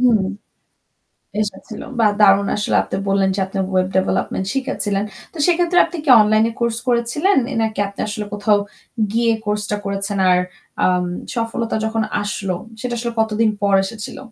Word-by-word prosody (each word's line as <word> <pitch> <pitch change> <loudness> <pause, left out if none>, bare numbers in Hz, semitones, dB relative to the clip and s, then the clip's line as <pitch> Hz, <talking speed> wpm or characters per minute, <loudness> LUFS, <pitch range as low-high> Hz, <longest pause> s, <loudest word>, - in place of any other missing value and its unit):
হুম। 235 -5 +4 1.2
এসেছিল। 215 +1 -5 0.2
বাহ! 215 -2 +5
দারুণ 200 0 +5
আসলে। 210 - 0
আপনি - - -4
বললেন 195 0 +2
যে - - -1
আপনি 195 +1 -6 0.2
web 185 0 +2
development 190 0 -1
শিখেছিলেন। 205 -7 -1 0.3
তো - - -16
সেক্ষেত্রে 350 0 +2
আপনি 340 +1 -7
কি 280 - +2
অনলাইন 215 +1 +4 0.2
কোর্স 235 -1 +1
করেছিলেন? 245 +11 +2 0.3
নাকি 220 -2 -2
আপনি 200 - -9
আসলে 210 0 -3
কোথাও 205 0 +3 0.6
গিয়ে 230 0 +2
কোর্স 210 0 -1
টা 210 - +1
করেছেন? 200 0 -2
আর 180 - +5 0.5
আম 180 -1 +2 0.3
সফলতা 230 0 -2
যখন 220 0 0 0.2
আসলো, 195 -2 -2 0.3
সেটা 250 -1 -3
আসলে 235 0 -3
কতদিন 220 0 +2
পর 200 -1 +2
এসেছিল? 215 +1 -6
215 Hz, 155 wpm, -19 LUFS, 200-235 Hz, 1.2 s, বাহ